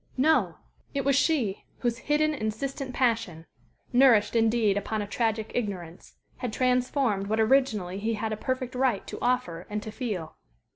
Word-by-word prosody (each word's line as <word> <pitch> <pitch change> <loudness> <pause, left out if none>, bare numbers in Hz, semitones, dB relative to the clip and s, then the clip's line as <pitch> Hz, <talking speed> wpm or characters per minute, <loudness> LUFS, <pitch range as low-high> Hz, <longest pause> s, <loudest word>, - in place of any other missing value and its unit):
No! 310 +5 +3 0.4
It 275 -1 -1
was 275 -1 +3
she, 260 - +1 0.2
whose 235 -1 0
hidden, 305 +3 +1
insistent 265 +3 -3
passion 225 -10 0 0.5
nourished, 245 -4 +5
indeed, 225 -2 +3
upon 210 +1 -2
a - - -7
tragic 220 0 -1
ignorance 185 -7 -5 0.2
had 245 - -3
transformed 250 -4 +1
what 220 +2 0
originally 220 -6 +2
he 225 +2 -1
had 220 +1 -2
a - - -1
perfect 255 +3 -3
right 250 -5 +1
to - - -7
offer 240 -9 -1
and 210 0 -3
to 215 - -6
feel. 210 -9 -4
225 Hz, 155 wpm, -27 LUFS, 210-255 Hz, 0.5 s, nourished